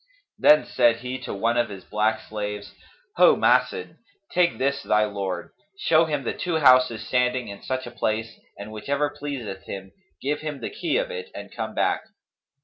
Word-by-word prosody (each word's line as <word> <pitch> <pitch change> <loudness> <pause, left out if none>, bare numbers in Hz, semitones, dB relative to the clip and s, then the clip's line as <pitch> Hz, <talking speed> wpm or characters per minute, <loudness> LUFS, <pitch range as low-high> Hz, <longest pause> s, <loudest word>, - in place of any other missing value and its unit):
Then 150 0 +6
said 120 -2 +3
he 125 +1 -4
to 130 - -6
one 115 +4 +1
of 120 0 +2
his 95 -2 -9
black 110 +1 0
slaves, 105 -1 -5 0.4
'Ho - - +7
Mas'dd, - - +2 0.3
take 175 -1 +2
this 140 +1 0
thy 105 0 +3
lord: 95 -4 -4 0.3
show 165 -3 +4
him 150 -3 -2
the - - -2
two 175 -2 -2
houses 125 -6 +5
standing 125 -2 +1
in 100 0 -9
such 130 0 -3
a 120 - -8
place, 110 -1 -2 0.2
and 105 +2 -8
whichever 140 +7 -1
pleaseth 135 -9 -6
him, 95 -1 -7 0.3
give 145 +2 -1
him 150 -3 -5
the - - -5
key 420 - -1
of - - -1
it 465 -1 -6
and - - -9
come - - -4
back.' - - +1
120 Hz, 180 wpm, -25 LUFS, 105-145 Hz, 0.4 s, Ho